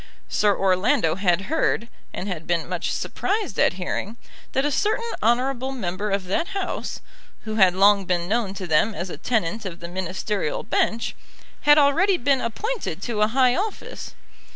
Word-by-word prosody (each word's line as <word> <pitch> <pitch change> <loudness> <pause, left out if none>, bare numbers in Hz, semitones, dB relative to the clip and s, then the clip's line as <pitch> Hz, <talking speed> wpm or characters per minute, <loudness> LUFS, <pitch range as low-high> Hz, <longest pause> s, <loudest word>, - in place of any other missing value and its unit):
Sir 205 -2 +2
Orlando 185 -4 +2
had 180 0 +1
heard, 235 -2 0 0.2
and 190 - -5
had 170 -5 -5
been 170 -2 0
much 175 -1 -2
surprised 410 - -2
at - - +4
hearing, 190 +4 -4 0.4
that 270 +2 +1
a 295 - +1
certain 435 - 0 0.2
honourable 255 +3 +1
member 205 -4 -3
of 195 -1 0
that 335 - -1
House, 385 - -4 0.4
who 215 0 -4
had 185 -3 +5
long 200 0 +5
been 175 -1 0
known 210 -2 0
to 190 - -5
them 175 +6 +2
as 175 +1 -4
a - - -6
tenant 215 +1 -1
of 180 -4 -6
the 170 - -7
Ministerial 190 0 -2
bench, 230 +1 0 0.5
had 295 - +9
already 330 +7 +4
been 275 -2 +2
appointed 375 - -3
to 220 -3 -2
a 210 - +5
high 250 +2 +3
office. 415 +3 -5
210 Hz, 170 wpm, -23 LUFS, 185-265 Hz, 0.5 s, had